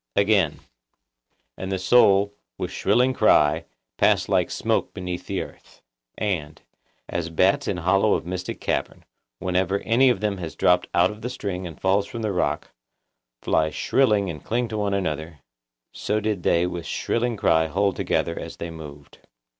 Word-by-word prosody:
Again:— 100 Hz, -6 st, +2 dB, 1.0 s
'And 95 Hz, 0 st, -4 dB
the 95 Hz, -, 0 dB
soul, 100 Hz, 0 st, +4 dB, 0.2 s
with -, -, -4 dB
shrilling 125 Hz, +6 st, +2 dB
cry, 75 Hz, -11 st, +3 dB, 0.3 s
passed -, -, +3 dB
like -, -, +2 dB
smoke -, -, -1 dB
beneath 90 Hz, -1 st, -5 dB
the -, -, -2 dB
earth.' -, -, -16 dB, 0.3 s
And,— 85 Hz, -8 st, -2 dB, 0.5 s
'As 85 Hz, -1 st, -3 dB
bats 90 Hz, +4 st, +2 dB
in 95 Hz, -, -1 dB
hollow 95 Hz, +5 st, +3 dB
of -, -, -4 dB
mystic 90 Hz, 0 st, -5 dB
cavern, -, -, -3 dB, 0.3 s
whenever 95 Hz, +3 st, 0 dB
any 125 Hz, +4 st, +4 dB
of 120 Hz, -, +1 dB
them 105 Hz, -1 st, -1 dB
has 85 Hz, -3 st, -6 dB
dropped 90 Hz, 0 st, +3 dB
out 90 Hz, +2 st, +4 dB
of 105 Hz, +1 st, -11 dB
the 125 Hz, -, -3 dB
string 95 Hz, -7 st, -4 dB
and 80 Hz, -3 st, -11 dB
falls 100 Hz, +1 st, +2 dB
from 115 Hz, -1 st, -6 dB
the 105 Hz, -, 0 dB
rock, 90 Hz, -, -1 dB, 0.7 s
fly 80 Hz, 0 st, +2 dB
shrilling 105 Hz, -, +2 dB
and 80 Hz, -5 st, -6 dB
cling 120 Hz, +1 st, -1 dB
to 110 Hz, -, -4 dB
one 100 Hz, -1 st, 0 dB
another, 80 Hz, -5 st, -3 dB, 0.5 s
so 105 Hz, +1 st, -1 dB
did 105 Hz, -3 st, -2 dB
they 85 Hz, +1 st, +2 dB
with 90 Hz, -2 st, -5 dB
shrilling 120 Hz, -1 st, -1 dB
cry 80 Hz, -4 st, +3 dB
hold 95 Hz, +4 st, 0 dB
together 85 Hz, -, -1 dB
as -, -, -8 dB
they 85 Hz, 0 st, -5 dB
moved. 75 Hz, -3 st, -11 dB
95 Hz, 165 wpm, -24 LUFS, 85-105 Hz, 1.0 s, soul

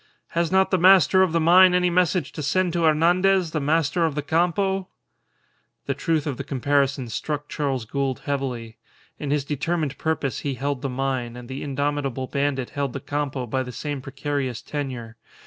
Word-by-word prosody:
"Has 170 Hz, 0 st, 0 dB
not 190 Hz, 0 st, +3 dB
the 185 Hz, -, +3 dB
master 185 Hz, +1 st, +6 dB
of 190 Hz, -3 st, +3 dB
the 165 Hz, -, +2 dB
mine 180 Hz, +3 st, +6 dB
any 180 Hz, -1 st, +2 dB
message 175 Hz, -4 st, +1 dB
to 155 Hz, -, -6 dB
send 175 Hz, +5 st, +1 dB
to 170 Hz, -1 st, +1 dB
Hernandez, 175 Hz, +3 st, +3 dB
the 155 Hz, -, -1 dB
master 160 Hz, +3 st, +1 dB
of 160 Hz, -3 st, 0 dB
the 150 Hz, -, -2 dB
Campo?" 180 Hz, +5 st, +1 dB, 1.0 s
The -, -, 0 dB
truth 160 Hz, -4 st, -1 dB
of 140 Hz, -5 st, -3 dB
the 140 Hz, -, -4 dB
comparison 140 Hz, -1 st, 0 dB
struck 145 Hz, +5 st, -4 dB
Charles 135 Hz, -6 st, -2 dB
Gould 135 Hz, +2 st, -2 dB
heavily. 125 Hz, -5 st, -4 dB, 0.4 s
In 145 Hz, -, -4 dB
his 145 Hz, -1 st, 0 dB
determined 150 Hz, 0 st, -2 dB
purpose 160 Hz, -4 st, -1 dB
he 140 Hz, -2 st, -3 dB
held 140 Hz, +1 st, -2 dB
the 140 Hz, -, -2 dB
mine, 130 Hz, -2 st, -2 dB
and 125 Hz, -1 st, -9 dB
the 130 Hz, +2 st, -6 dB
indomitable 140 Hz, -2 st, -2 dB
bandit 140 Hz, -1 st, -1 dB
held 140 Hz, -3 st, -2 dB
the 140 Hz, -, -4 dB
Campo 145 Hz, -2 st, -3 dB
by 130 Hz, +3 st, -1 dB
the 125 Hz, -1 st, -5 dB
same 145 Hz, +3 st, -4 dB
precarious 135 Hz, -2 st, -3 dB
tenure. 125 Hz, -6 st, -5 dB
145 Hz, 180 wpm, -24 LUFS, 135-165 Hz, 1.0 s, master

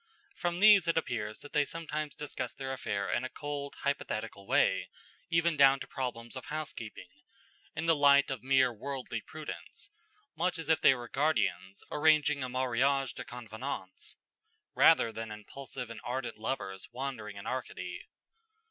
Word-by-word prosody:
From 175 Hz, 0 st, -1 dB
these 205 Hz, -4 st, +8 dB
it 165 Hz, -, +2 dB
appears 110 Hz, -8 st, -2 dB
that 145 Hz, -, -12 dB
they 150 Hz, -2 st, +4 dB
sometimes 155 Hz, -1 st, -4 dB
discussed 140 Hz, -4 st, -5 dB
their 135 Hz, -1 st, -3 dB
affair 100 Hz, -6 st, -2 dB
in 120 Hz, -, +1 dB
a 130 Hz, -, -3 dB
cold, 145 Hz, 0 st, -5 dB
hypothetical 110 Hz, -7 st, -2 dB
way, 95 Hz, 0 st, +3 dB, 0.4 s
even 165 Hz, -1 st, +3 dB
down 135 Hz, -1 st, +6 dB
to -, -, -5 dB
problems 120 Hz, -3 st, -4 dB
of 130 Hz, -, -6 dB
housekeeping, 150 Hz, -8 st, -5 dB, 0.7 s
in 160 Hz, +1 st, -2 dB
the 165 Hz, -1 st, +5 dB
light 140 Hz, -1 st, +6 dB
of 135 Hz, -, -3 dB
mere 130 Hz, -1 st, +4 dB
worldly 125 Hz, 0 st, -4 dB
prudence, 155 Hz, -, -8 dB, 0.4 s
much 175 Hz, +3 st, 0 dB
as 160 Hz, -1 st, -6 dB
if 160 Hz, -, +4 dB
they 135 Hz, -, +7 dB
were 120 Hz, -1 st, -7 dB
guardians 110 Hz, -9 st, 0 dB
arranging 150 Hz, -2 st, +4 dB
a 130 Hz, -, -3 dB
mariage 130 Hz, +1 st, +1 dB
de -, -, -6 dB
convenance, 115 Hz, -4 st, -6 dB, 0.6 s
rather 115 Hz, -, +6 dB
than 115 Hz, 0 st, -5 dB
impulsive 125 Hz, +3 st, -7 dB
and 115 Hz, -, -8 dB
ardent 125 Hz, -2 st, -3 dB
lovers 100 Hz, -5 st, -3 dB
wandering 120 Hz, -6 st, -5 dB
in 100 Hz, -, -8 dB
Arcady. 130 Hz, 0 st, -5 dB
135 Hz, 155 wpm, -31 LUFS, 115-150 Hz, 0.7 s, these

